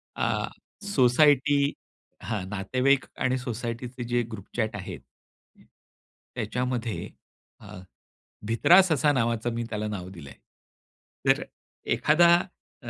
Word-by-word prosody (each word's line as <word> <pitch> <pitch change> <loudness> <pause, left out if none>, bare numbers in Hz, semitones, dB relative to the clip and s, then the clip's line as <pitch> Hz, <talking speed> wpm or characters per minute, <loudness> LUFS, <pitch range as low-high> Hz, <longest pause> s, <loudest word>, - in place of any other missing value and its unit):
अ, - - -1 0.4
society 145 -2 +4 0.7
हां, 105 -2 -3
नातेवाईक 130 +8 +1
आणि 130 0 +1
सोसायटीचे 120 0 -5
जे 120 +1 0
ग्रुप 100 -3 -8
चॅट 110 -3 -1
आहेत. 95 -3 -7 1.4
त्याच्यामध्ये 120 +1 -3 0.5
अ, - - -14 0.8
भित्रा 145 - +6
ससा 185 -3 +1
असा 150 0 +3
नावाचा 115 -2 0
मी 120 0 -2
त्याला 105 -1 -3
नाव 95 -4 -5
दिलंय. 80 -7 -11 0.9
तर - - +4 0.5
एखादा 170 +3 +4 0.5
अ, 120 - -7
120 Hz, 105 wpm, -26 LUFS, 110-130 Hz, 1.4 s, भित्रा